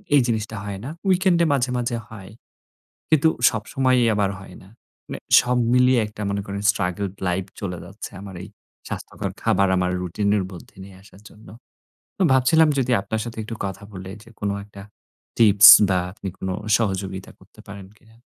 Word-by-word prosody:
এই 140 - +6
জিনিসটা 110 -1 -2
হয় 100 -1 -6
না। - - -5 0.2
weekend 185 -2 +3
এ - - +3
মাঝে, 130 -2 0
মাঝে 120 -1 -2
হয়। 100 -3 -11 0.8
কিন্তু 160 0 +4 0.2
সবসময়ই 125 +3 0
আমার 100 -1 0
হয় 95 -2 -13
না। 95 - -17 0.4
মানে - - -7 0.2
সব 125 0 -1 0.2
মিলিয়ে 125 0 +4
একটা 105 0 -11
মনে 100 0 -2
করেন 100 0 -5
struggled 95 +1 -3
life 95 +2 -2
চলে 90 -3 -4
যাচ্ছে 100 +4 -9
আমার 100 -2 -10
এই - - -9 0.4
স্বাস্থ্যকর - - -6
খাবার 100 0 +2
আমার 90 0 0
রুটিনের 100 +3 -1
মধ্যে 90 - -13
নিয়ে 95 -1 -13
আসার 100 -1 -18
জন্য। 110 +2 -18 0.7
তো - - -5
ভাবছিলাম 155 +5 +4
যদি 125 -1 -1
আপনার 110 +2 -4
সাথে 115 -1 -8
একটু 115 +1 -7
কথা 95 +1 -6
বলে 95 0 -8
যে 115 - -18
কোন 105 - -1 0.2
একটা 100 -1 -13 0.6
টিপস 105 -3 +8 0.2
বা 95 -1 +2
আপনি 100 0 -9
কোন 95 - -5 0.3
সহযোগিতা 95 -3 -4
করতে - - -22
পারেন 100 -1 -10
কিনা? 110 +1 -24
105 Hz, 175 wpm, -22 LUFS, 95-120 Hz, 0.8 s, টিপস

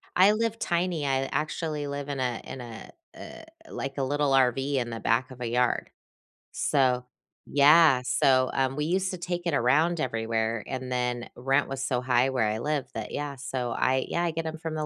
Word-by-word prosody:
I 190 +3 +6
live 225 0 -1
tiny. 170 -3 -1
I 135 -1 +1
actually 150 -1 -2
live 140 0 -5
in 140 -2 -3
a 125 -3 -2
in 130 - -8
a, 115 -2 -10 0.2
eh, 320 - -11 0.2
like, 135 +1 -5
a 135 - 0
little 145 +1 0
RV 135 +2 +2
in 120 -1 -3
the 115 -1 -5
back 120 +5 0
of 125 - -11
a 120 - -3
yard. 125 +1 0 0.6
So, 125 -3 +1 0.4
yeah. 145 -1 +6
So, 130 -1 +3
um, 135 0 0
we 150 0 -1
used 185 +3 0
to 185 - -5
take 175 0 -4
it 165 - 0
around 155 +8 +2
everywhere, 115 -2 -1
and 130 -1 -5
then 125 -1 -2
rent 135 +3 +1
was 135 0 -4
so 125 -2 0
high 125 +1 +2
where 125 -5 +1
I 110 +1 -1
live 145 +1 -2
that 110 -2 -5
Yeah, 145 -1 -4
so 125 -2 -3
I 130 +2 +1
Yeah, 170 - -1
I 170 - 0
get 165 0 -4
‘em 160 0 -4
from 160 -1 -4
the 155 -1 -2
135 Hz, 205 wpm, -27 LUFS, 125-155 Hz, 0.6 s, I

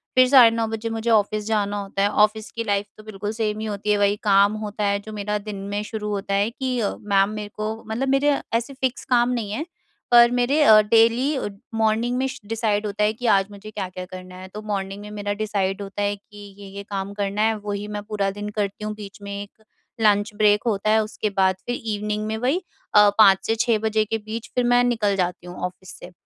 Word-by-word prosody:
फिर 255 0 +6
साढ़े 250 -4 +8
9 230 - 0
बजे 225 +1 -4
मुझे 225 +1 -2
ऑफ़िस 215 -1 +2
जाना 205 -2 0
होता 195 0 -3
है, 200 - +3
ऑफ़िस 215 +1 +2
की 230 - -4
लाइफ़ 205 -1 -1
तो 215 - -13
बिल्कुल 210 -1 -5
सेम 215 -1 -2
ही 220 - -4
होती 210 0 -2
है। 205 - +3
वही 205 0 +3
काम 200 0 +4
होता 210 0 -4
है 200 0 +1
जो 215 +2 -10
मेरा 210 0 -2
दिन 210 0 -7
में 205 0 -2
शुरू 210 -1 -5
होता 200 -1 -3
है 200 +3 +2
कि 255 0 -3
अ, 205 -3 -1
मैम, 200 -1 +2
मेरे 210 -1 -6
को 215 +1 -4
मतलब 230 +5 -2
मेरे 280 +1 +3 0.2
ऐसे 235 +4 -1
फ़िक्स 260 -1 -2
काम 240 -1 +4
नहीं 230 -5 -2
है। 285 +9 -3 0.5
पर 235 0 +7
मेरे 245 +5 +2
अ, 215 -5 +8
डेली 230 +6 +3
अ, - - -2 0.3
मॉर्निंग 225 +3 +1
में 265 +1 0 0.2
डिसाइड 215 -1 -1
होता 210 +1 -1
है 215 +1 +2
कि 245 +2 -8
आज 195 -3 +4
मुझे 205 +1 -10
क्या-क्या 185 -3 -5
करना 185 0 -10
है। 185 0 -9
तो 210 - -6
मॉर्निंग 195 0 -3
में 210 0 -9
मेरा 205 -1 -3
डिसाइड 195 -2 -1
होता 200 0 -5
है 205 0 0
कि 205 +1 -18 0.2
ये-ये 200 0 -8
काम 200 0 -4
करना 200 0 -2
है, 220 0 +3
वही 205 0 -5
मैं 210 -1 -5
पूरा 210 -2 -1
दिन 205 +1 -6
करती 205 +1 -2
हूँ। 215 - -3
बीच 205 -1 -11
में 200 0 -7
एक 205 +2 -13 0.4
लंच 205 0 +3
ब्रेक 210 0 +3
होता 215 -1 0
है, 220 0 +4
उसके 215 0 -3
बाद 190 -2 +2
फिर 245 - -2
इवनिंग 210 0 -2
में 220 - -2
वही 265 +11 0 0.3
अ, 210 0 +8
5 195 -3 +6
से 225 - +1
6 230 -1 +3
बजे 220 0 +1
के 225 - -2
बीच 220 +1 -7
फिर 250 - +2
मैं 245 0 +4
निकल 220 -5 +1
जाती 180 -1 -2
हूँ 175 - -8
ऑफ़िस 180 +1 -9
से। 180 - -11
210 Hz, 235 wpm, -23 LUFS, 200-225 Hz, 0.5 s, साढ़े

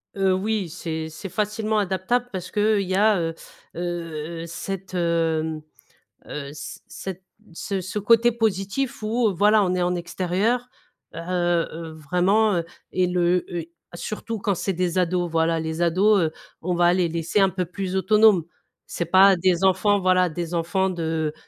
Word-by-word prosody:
Heu 195 -1 +2
oui, 200 -1 -1
c'est 160 -1 -5
c'est 175 +6 -8
facilement 215 +2 -1
adaptable 200 +6 0
parce 185 -2 -6
qu'il 210 -1 +2
y 185 -1 -3
a, 210 +1 +4
heu, 165 -1 -2 0.4
heu, 165 -2 -4
heu, - - -6
cette 190 +3 -6
hem, 165 -3 0 0.6
heu, 140 -2 -6
c 125 -4 -8
cette 190 -1 -7 0.3
ce 195 +3 -3
ce 190 +3 -4
côté 230 +3 +4
positif 225 +4 -1
où, 225 -1 +1
voilà, 210 +3 +4
on 185 -1 +1
est 180 - 0
en 180 0 +1
extérieur 185 +8 -1 0.5
heu, - - -6 0.5
heu, 165 0 -7
vraiment, 180 +7 +2
heu 170 - -1 0.3
et 185 -1 +1
le, 180 0 +1
heu, 170 -2 -4 0.3
surtout 215 +4 -5
quand 195 -2 0
c'est 190 +2 -1
des 180 0 -1
ados, 180 -1 0
voilà, 165 0 +1
les 160 +1 -3
ados, 195 +5 +4
heu, 160 -1 0 0.3
on 180 +1 -1
va 175 0 +4
les 180 -2 +2
laisser 165 +4 -1
un 195 -1 +4
peu 185 0 -2
plus 185 +2 -5
autonomes. 210 -2 +4 0.4
C'est 170 - -3
pas 190 +2 +6
des 180 0 +1
enfants, 195 +2 +3
voilà, 185 -1 +3
des 170 +1 -5
enfants 175 +3 0
de 160 -3 -2
185 Hz, 170 wpm, -23 LUFS, 170-200 Hz, 0.6 s, pas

